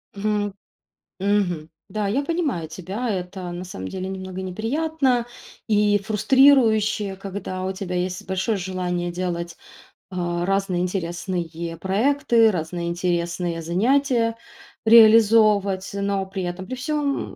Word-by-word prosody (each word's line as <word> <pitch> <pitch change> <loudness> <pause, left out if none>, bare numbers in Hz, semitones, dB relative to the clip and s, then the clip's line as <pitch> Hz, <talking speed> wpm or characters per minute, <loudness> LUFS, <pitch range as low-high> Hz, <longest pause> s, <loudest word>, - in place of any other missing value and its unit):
Мгм. 205 0 -1 0.7
Мгм. 185 -6 0 0.2
Да, 210 -2 -2
я 255 +8 +1
понимаю 285 - -1
тебя. 195 +9 -5
Это 180 -2 -4
на 175 +1 -5
самом 95 - -7
деле 185 - -5
немного 190 -1 -6
неприятно 250 - 0 0.4
и 210 -1 +3
фрустрирующе, 220 -2 +3
когда 190 -1 -6
у 190 - -2
тебя 185 -2 -5
есть 180 0 -3
большое 190 +3 0
желание 180 -1 -2
делать, 170 -1 -4 0.5
а, 175 -1 -2
разные 195 -2 0
интересные 170 -2 -3
проекты, 225 - +3
разные 170 0 -3
интересные 170 -1 -1
занятия 230 - +1 0.5
реализовывать, 215 -3 +6
но 200 -1 -1
при 190 -1 -5
этом 175 +2 -4
при 255 - -5
всём, 285 +1 -2
190 Hz, 120 wpm, -23 LUFS, 180-220 Hz, 0.7 s, реализовывать